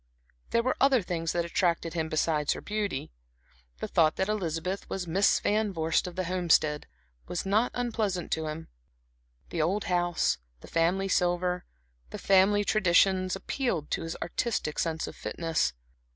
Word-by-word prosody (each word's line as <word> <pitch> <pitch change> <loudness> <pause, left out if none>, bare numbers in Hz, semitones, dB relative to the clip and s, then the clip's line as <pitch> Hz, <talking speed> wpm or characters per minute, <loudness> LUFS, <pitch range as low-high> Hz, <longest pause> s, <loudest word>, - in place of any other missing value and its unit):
There 235 - +2
were 255 - +1
other 265 -5 +4
things 165 -2 -2
that 170 -1 0
attracted 170 -1 0
him 160 -2 -2
besides 155 -2 +1
her - - -7
beauty. 205 - -3 0.7
The - - -2
thought 155 -2 +3
that 190 +2 -1
Elizabeth 185 -2 -2
was 190 -2 -3
Miss 185 +4 +3
Van 210 0 +1
Vorst 165 0 0
of 180 - -7
the 185 - -1
Homestead 165 -4 +2 0.4
was 175 - -3
not 215 +5 +2
unpleasant 220 -7 -2
to 160 -1 -1
him; 155 +1 -6 0.8
the 170 - -1
old 190 +6 +1
house, 175 - +1 0.2
the - - -12
family 175 +4 +1
silver, 180 -1 +1 0.4
the - - -6
family 195 +2 +4
traditions, 185 -2 +3
appealed 190 - -2
to - - 0
his 165 0 -5
artistic 175 -5 -2
sense 160 -1 -1
of - - -8
fitness. 165 - -1
180 Hz, 155 wpm, -28 LUFS, 165-200 Hz, 0.8 s, other